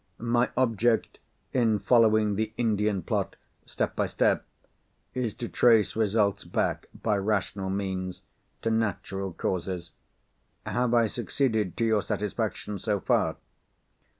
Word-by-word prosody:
My 120 Hz, +1 st, +1 dB
object 115 Hz, -2 st, +1 dB, 0.3 s
in 115 Hz, -4 st, +3 dB
following 110 Hz, 0 st, +4 dB
the 110 Hz, +2 st, -2 dB
Indian 105 Hz, -4 st, +1 dB
plot, -, -, -1 dB, 0.3 s
step -, -, -2 dB
by -, -, +1 dB
step, -, -, +2 dB, 0.7 s
is 125 Hz, -5 st, -2 dB
to 120 Hz, -, -5 dB
trace 115 Hz, -4 st, +4 dB
results 105 Hz, -2 st, +1 dB
back, -, -, -1 dB, 0.2 s
by 105 Hz, -2 st, +2 dB
rational 100 Hz, -1 st, -1 dB
means, 95 Hz, -2 st, -3 dB, 0.4 s
to 115 Hz, -, +1 dB
natural 100 Hz, -3 st, -1 dB
causes. 90 Hz, +1 st, -3 dB, 0.7 s
Have 120 Hz, -1 st, +1 dB
I 115 Hz, -1 st, +5 dB
succeeded 110 Hz, -3 st, -1 dB
to 115 Hz, -, +1 dB
your 110 Hz, -2 st, +3 dB
satisfaction 105 Hz, -1 st, -3 dB
so 105 Hz, +1 st, 0 dB
far?" -, -, +1 dB
110 Hz, 125 wpm, -27 LUFS, 100-115 Hz, 0.7 s, I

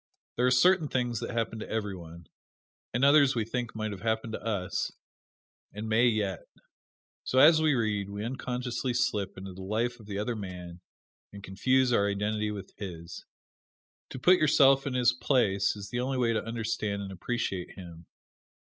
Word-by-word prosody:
There 125 Hz, +1 st, +2 dB
are -, -, +5 dB
certain 160 Hz, +6 st, +4 dB
things 120 Hz, -4 st, -1 dB
that -, -, -5 dB
happen 115 Hz, -1 st, -2 dB
to -, -, -7 dB
every 105 Hz, -3 st, -2 dB
one, 85 Hz, -1 st, -11 dB, 0.7 s
and 125 Hz, +3 st, +2 dB
others 140 Hz, -2 st, +5 dB
we 115 Hz, -2 st, 0 dB
think 120 Hz, 0 st, -4 dB
might 110 Hz, -1 st, -3 dB
have 95 Hz, -3 st, -7 dB
happened 110 Hz, 0 st, -1 dB
to -, -, -5 dB
us, 100 Hz, -5 st, -2 dB, 0.8 s
and 105 Hz, +2 st, -5 dB
may 110 Hz, +3 st, +4 dB
yet. 105 Hz, -5 st, -1 dB, 0.8 s
So 130 Hz, -, -2 dB
as 155 Hz, +4 st, +7 dB
we 155 Hz, -3 st, +3 dB
read, 105 Hz, -4 st, -1 dB
we 100 Hz, +1 st, -5 dB
unconsciously 125 Hz, 0 st, -3 dB
slip 105 Hz, -6 st, -1 dB
into 95 Hz, 0 st, -8 dB
the 95 Hz, -, -10 dB
life 115 Hz, +5 st, -2 dB
of 110 Hz, -, -14 dB
the 100 Hz, -1 st, -4 dB
other 105 Hz, +3 st, -2 dB
man 90 Hz, -4 st, -8 dB, 0.5 s
and 100 Hz, -1 st, -11 dB
confuse 130 Hz, +7 st, +2 dB
our 100 Hz, -2 st, +3 dB
identity 105 Hz, +1 st, -1 dB
with 100 Hz, -3 st, -7 dB
his. 85 Hz, -4 st, -8 dB, 0.8 s
To -, -, -7 dB
put 180 Hz, +8 st, +5 dB
yourself 135 Hz, -2 st, +5 dB
in 130 Hz, -, -2 dB
his 125 Hz, -1 st, +4 dB
place 105 Hz, -7 st, +1 dB
is 100 Hz, -1 st, -8 dB
the 120 Hz, -, -2 dB
only 130 Hz, +1 st, -1 dB
way 120 Hz, -2 st, +2 dB
to 110 Hz, -, -1 dB
understand 110 Hz, -3 st, -3 dB
and 95 Hz, -, -7 dB
appreciate 95 Hz, -1 st, -3 dB
him. 85 Hz, -3 st, -11 dB
110 Hz, 180 wpm, -29 LUFS, 100-125 Hz, 0.8 s, as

